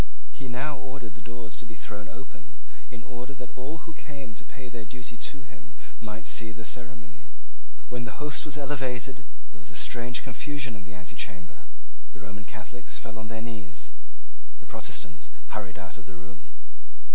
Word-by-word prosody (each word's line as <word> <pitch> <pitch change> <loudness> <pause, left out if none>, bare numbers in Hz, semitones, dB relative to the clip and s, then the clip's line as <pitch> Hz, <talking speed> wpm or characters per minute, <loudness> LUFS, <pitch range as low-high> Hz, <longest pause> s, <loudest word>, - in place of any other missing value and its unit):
He 135 - -2
now 135 +3 +4
ordered 130 -5 -2
the 105 - -9
doors 115 0 -1
to - - -5
be 110 - -4
thrown 105 +1 -2
open, 130 +2 -7 0.3
in 120 -2 -4
order 125 +2 -2
that 125 -1 -3
all 145 +6 -1
who 165 - -3
came 140 -6 -3
to 105 - -4
pay 130 +4 -6
their 120 -1 -1
duty 120 +2 -3 0.2
to 140 -2 -5
him 115 - -12 0.3
might 110 0 -1
see 115 -2 +6
the 110 +1 -3
ceremony. 115 -10 -1 0.6
When 125 -1 +2
the - - -4
host 150 -1 +5
was 150 -1 +1
elevated 135 -3 +4 0.4
there 105 - -10
was 100 - -4
a 100 - -6
strange 120 +2 +5
confusion 140 0 +3
in 95 -2 -4
the 95 - -4
antechamber. 90 -1 -1 0.5
The 105 - -7
Roman 100 +1 -3
Catholics 110 +3 -1
fell 110 -1 -2
on 110 - -1
their 110 -1 +1
knees: 95 -6 -1 0.7
the - - -14
Protestants 85 -4 0 0.2
hurried 100 -5 +1
out 90 +1 -1
of 95 - -11
the 90 - -4
room. 90 0 -8
115 Hz, 180 wpm, -35 LUFS, 105-130 Hz, 0.7 s, see